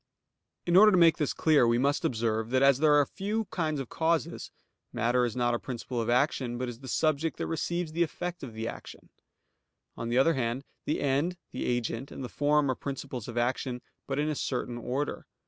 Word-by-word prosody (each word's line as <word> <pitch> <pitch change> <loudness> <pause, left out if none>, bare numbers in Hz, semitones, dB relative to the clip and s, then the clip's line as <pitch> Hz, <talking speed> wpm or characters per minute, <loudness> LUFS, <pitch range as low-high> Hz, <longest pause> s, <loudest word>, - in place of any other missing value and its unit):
In 175 - +2
order 210 +3 +8
to 185 - +4
make 165 -2 +6
this 150 - 0
clear, 150 -6 +3
we 115 0 +3
must 140 +7 +1
observe 115 -6 0
that 130 +2 +2
as 135 -1 +5
there 150 -1 +5
are 145 -1 +5
few 210 +8 -3
kinds 155 -4 -1
of 135 - -5
causes; 165 0 -1 0.4
matter 120 +2 +2
is 115 - -3
not 120 -1 +1
a 120 - 0
principle 125 -1 -4
of 115 - -2
action, 125 -1 +1
but 125 +1 -3
is 120 -1 -7
the 135 - -10
subject 155 +4 0
that - - -2
receives 170 0 -2
the 165 +2 -2
effect 175 +1 -2
of 115 -5 -8
action. 115 +1 -7 0.9
On 115 - -4
the 120 - +1
other 165 +6 +5
hand, 125 -1 -2 0.2
the 150 - -1
end, 145 +6 0
the - - -4
agent, 120 +1 -2
and - - -7
the 125 - -5
form 145 -1 +2
are - - +1
principles 135 -4 -6
of 120 -1 -7
action, 125 +1 -1 0.2
but 135 - -2
in 150 +1 +1
a 155 - 0
certain 125 -3 -3
order. 130 +5 -3
135 Hz, 210 wpm, -29 LUFS, 120-155 Hz, 0.9 s, order